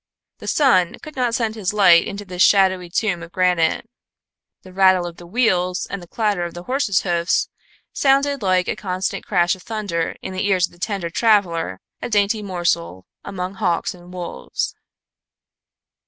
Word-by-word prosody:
The - - -9
sun 185 - +3
could 305 - -10
not 245 -3 0
send 225 -2 -1
his 205 -3 -2
light 180 -5 +6
into 200 +1 -6
this 180 -1 -4
shadowy 185 -3 +4
tomb 180 -1 -1
of 165 +1 -10
granite. 180 +2 +1 0.8
The 185 - -13
rattle 185 -1 +4
of 170 -1 -7
the 175 - -12
wheels 185 -4 +1
and 200 - -4
the 175 - -12
clatter 205 -3 -1
of 170 0 -6
the 175 - -7
horses' 250 -5 +1
hoofs 175 -1 0 0.4
sounded 280 0 +2
like 185 -2 +2
a - - -1
constant 185 0 -3
crash 175 -3 +2
of 185 - -16
thunder 200 -7 -3
in 190 - -5
the 185 +2 -1
ears 185 -3 +3
of - - -16
the 175 - -20
tender 195 -3 -3
traveler, 170 - +1 0.2
a - - -4
dainty 210 0 +2
morsel 165 - -2 0.2
among 185 -1 -5
hawks 185 -4 -1
and 175 0 -15
wolves. 180 -1 -4
185 Hz, 170 wpm, -21 LUFS, 175-210 Hz, 0.8 s, light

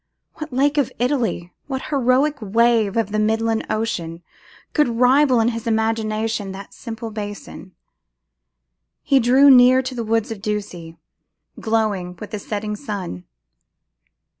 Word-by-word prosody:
What 310 0 -7
lake 285 +3 +2
of 275 - 0
Italy, 240 -9 -1
what 265 -2 -5
heroic 275 +2 +2
wave 225 0 +2
of 225 -3 0
the 215 - 0
midland 225 +1 0
ocean, 175 -7 -3 0.5
could 300 -3 +3
rival 250 +2 +3
in 225 +1 +3
his 230 -1 -5
imagination 220 -2 -1
that 195 0 -10
simple 225 -1 -7
basin! 205 -3 -8 1.3
He 275 - +3
drew 265 +4 +6
near 255 0 +6
to 260 0 -5
the 235 -2 -4
woods 225 0 -1
of 215 -3 -6
Ducie, 195 -6 -5 0.6
glowing 210 -5 -1
with 205 +4 -10
the 210 - -4
setting 210 +1 -4
sun. 195 - -6
225 Hz, 135 wpm, -21 LUFS, 210-250 Hz, 1.3 s, drew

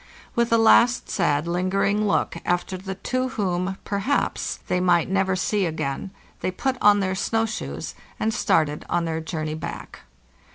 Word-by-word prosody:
With 235 0 +1
a 230 - +5
last 235 +2 +4
sad 145 +2 +1
lingering 195 +4 +1
look 200 - +1
after 175 +1 -1
the 190 +1 -6
two 255 +6 -1
whom, 190 -3 -1
perhaps, 205 +8 -1
they 180 - +1
might 180 -1 +2
never 190 -1 +2
see 190 +2 0
again, 155 +1 -3 0.3
they - - -1
put 260 +8 -1
on 205 -1 +6
their 190 -1 0
snow 225 +4 0
shoes 220 - -5 0.3
and 220 0 0
started 150 -6 +1
on 175 -1 +1
their 160 0 -2
journey 155 -1 -3
back. 155 - -7
190 Hz, 160 wpm, -24 LUFS, 170-210 Hz, 0.3 s, on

